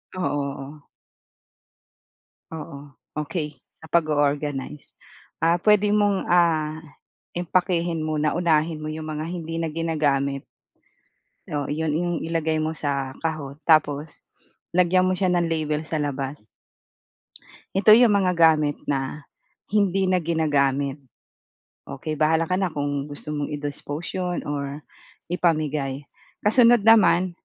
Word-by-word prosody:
Oo, 185 - -3 0.4
oo. 145 +2 -10 1.7
Oo. 145 -2 -8 0.2
Okey, 150 -2 -4 0.2
sa 160 - -14
pag-o-organize. 145 -3 0 0.6
Ah, 170 +2 +2
pwede 210 -1 +4
mong 205 -2 +2
ah, 160 -3 +2 0.6
impakehin 175 -2 0
muna 155 -1 0
unahin 160 -2 +1
mo 155 - -4
yung 155 0 -5
mga 155 0 -4
hindi 165 -2 -5
na 165 - -1
ginagamit. 145 -4 0 1.1
Oh 145 -1 -1
iyon 155 +1 -1
ing 175 +3 0
ilagay 160 -1 -1
mo 155 - -1
sa 140 -4 -2
kahon. 155 -3 -4
Tapos 150 -1 +3 0.6
lagyan 180 +1 +3
mo 185 - +2
siya 190 - +1
ng 175 -1 +2
label 155 -1 -1
sa 155 0 -3
labas. 140 -4 -4 1.3
Ito 215 +2 +7
yung 240 0 +7
mga 190 -3 +2
gamit 155 -3 +3
na, 140 +2 -2 0.5
hindi 195 -2 +2
na 185 - +3
ginagamit, 145 -4 +1 0.9
okey, 155 +2 -5
bahala 160 +1 +3
ka 185 +3 -1
na 190 - +1
kung 145 -2 -3
gusto 145 +1 -7
mong 145 -1 -2
i-dispose 145 +4 -5
yun 180 -1 -2
or 145 0 -4 0.5
ipamigay, 150 -5 0 0.4
kasunod 230 0 +5
naman, 200 -5 +5
155 Hz, 120 wpm, -24 LUFS, 145-175 Hz, 1.7 s, Ito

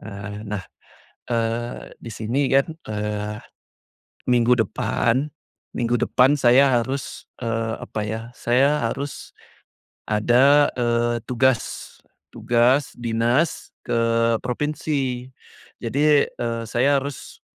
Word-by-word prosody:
Eee, 105 -1 -8
nah, 100 -3 -4 0.6
eee, 115 0 -2
di 115 - -9
sini 125 +6 -1
kan, 135 +4 +3 0.2
eee, 105 0 -3 0.9
minggu 120 0 +4
depan 120 +4 0 0.5
minggu 120 0 0
depan 130 +6 +3
saya 130 0 +5
harus, 135 +3 -5 0.2
eee, 115 -1 -1
apa 110 - -5
ya, 110 +1 -3
saya 135 +5 +2
harus 140 +2 -6 0.7
ada, 125 +7 +4
eee, 120 -1 +1
tugas, 125 -1 +3 0.7
tugas 125 +4 +2
dinas 120 +6 0 0.2
ke - - -1 0.4
provinsi. 130 -1 -2 0.6
Jadi, 145 +1 +3
eee, 115 -1 -3
saya 125 +5 +2
harus 140 0 -8
120 Hz, 100 wpm, -22 LUFS, 115-135 Hz, 0.9 s, saya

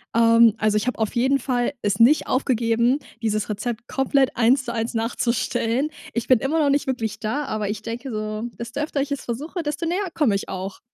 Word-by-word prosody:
Ähm, 230 -1 +6
also 215 -1 +2
ich 210 +4 -1
habe 250 - -2
auf 220 - 0
jeden 265 +3 +3
Fall 245 0 -1
es 205 0 0
nicht 265 +7 +5
aufgegeben, 240 0 +1 0.2
dieses 215 -1 -1
Rezept 225 +3 -4
komplett 270 0 +1
1 245 +3 +4
zu 240 - -4
1 225 +1 -2
nachzustellen. 235 +3 0 0.2
Ich 235 - -2
bin 255 -3 +5
immer 300 +7 0
noch 290 -2 +3
nicht 280 -1 +1
wirklich 230 -5 -2
da, 245 +7 -2
aber 215 -6 -3
ich 210 0 -4
denke 235 +4 -6
so, 215 0 -4
desto 235 +4 -6
öfter 295 -1 -1
ich 285 +1 -3
es 280 - -3
versuche, 300 +9 -4
desto 300 +2 -3
näher 365 +3 -1
komme 270 -10 +2
ich 195 - -2
auch. 190 +1 -5
235 Hz, 210 wpm, -23 LUFS, 220-275 Hz, 0.2 s, Ähm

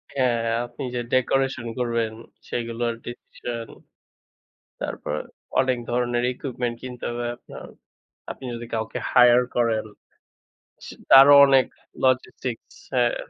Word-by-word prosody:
হ্যাঁ, 125 -3 +2
হ্যাঁ, 115 +1 0
আপনি - - -8
যে - - 0
ডেকোরেশন 130 -1 +1
করবেন, 115 -2 0 0.4
সেগুলোর 115 0 -2
ডিসিশন। 120 -1 -7 1.1
তারপর - - -4 0.5
অনেক 130 -1 +2
ধরনের 120 0 0
ইকুইপমেন্ট 125 -2 -4
কিনতে 125 -1 -8
হবে 120 0 -4
আপনার। - - -12 0.7
আপনি 130 - -10
যদি 120 0 -6
কাউকে 110 0 -3
হায়ার 125 0 +7
করেন 115 -3 +1 1.0
সি - - -9 0.2
তারও 135 +2 +10
অনেক 135 -2 +5 0.4
logistics 130 -2 -1 0.2
হ্যাঁ। 120 -2 +2
120 Hz, 115 wpm, -24 LUFS, 115-130 Hz, 1.1 s, তারও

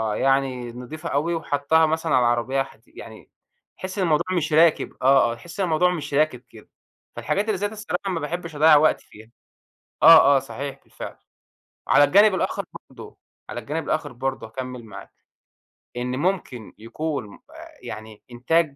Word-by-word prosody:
يعني 135 -3 0
نضيفة 140 +7 -8
أوي 155 +5 0
وحطّها 160 0 +1
مثلًا 160 -2 0
على 125 - +4
العربية 120 +3 +1
حدي 125 -4 -19
يعني 110 -1 -12 0.5
تحس 185 +2 -7
إن 190 - +1
الموضوع 155 -3 +1
مش 155 -2 -2
راكب 160 0 +3
آه، 130 -2 +4
آه، - - -8
تحس 170 +10 -12
إن - - +2
الموضوع 175 +2 +2
مش 150 -4 -6
راكب 145 -4 +1
كده. 110 - -16 0.5
فالحاجات 200 +2 -1
اللي 215 -4 -1
زي 205 +2 -1
دي 220 - -11
الصراحة 200 -2 -4
ما 170 - -2
باحبش 165 +1 -5
اضيّع 155 +1 +6
وقتي 155 +2 +3
فيها. 110 +2 -16 0.7
آه، 160 -3 +8
آه - - +2
صحيح، 140 +1 -7
بالفعل. - - -9 0.7
على 145 - +6
الجانب 200 +6 +5
الآخر - - -2 0.3
برضه، - - -12 0.3
على - - -5
الجانب 160 +3 -4
الآخر 155 -3 -2
برضه 130 -1 -4
هاكمّل 125 0 -7
معاك، 105 - -12 0.9
إن 125 +1 -3
ممكن 145 - -3
يكون 125 +3 -5
م - - -14 0.2
أ - - -12
يعني 110 -1 -9
إنتاج 145 +5 0
145 Hz, 170 wpm, -23 LUFS, 125-165 Hz, 0.9 s, آه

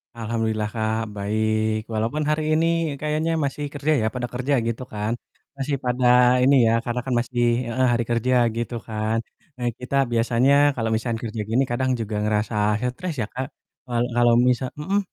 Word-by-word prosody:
Alhamdulillah 110 -2 -2
Kak, 110 0 -1
baik, 110 +1 0
walaupun 115 +8 -1
hari 155 0 +1
ini 165 -2 +1
kayaknya 155 +2 0
masih 145 +1 -2
kerja 145 +2 -1
ya, 110 - +2
pada 125 -1 -2
kerja 125 +3 -1
gitu 115 +2 -3
kan? 105 +2 -2 0.5
Masih 140 +1 -1
pada 125 0 0 0.4
ini 140 +2 +5
ya, 115 - +3
karena 120 +1 -2
kan 130 - -1
masih 120 0 -1 0.2
heeh, 130 +2 +1
hari 120 - +1
kerja 120 +2 +1 0.2
gitu 120 +1 -3
kan. 110 0 -1 0.4
Nah, 120 - -2
kita 125 +2 -4 0.2
biasanya 120 +3 +3 0.2
kalau 115 -2 -1
misalkan 115 0 -1
kerja 110 -1 -4
gini 120 +4 +3
kadang 130 +2 0
juga 110 -1 -3
ngerasa 105 +1 0 0.4
stres 180 +2 -5
ya, 105 - -2
Kak? 130 +1 -3 0.4
Wal 120 -1 +1
kalau 120 -1 +4
misa 125 +1 +2
mhm, 190 +7 0
120 Hz, 170 wpm, -23 LUFS, 110-135 Hz, 0.5 s, ini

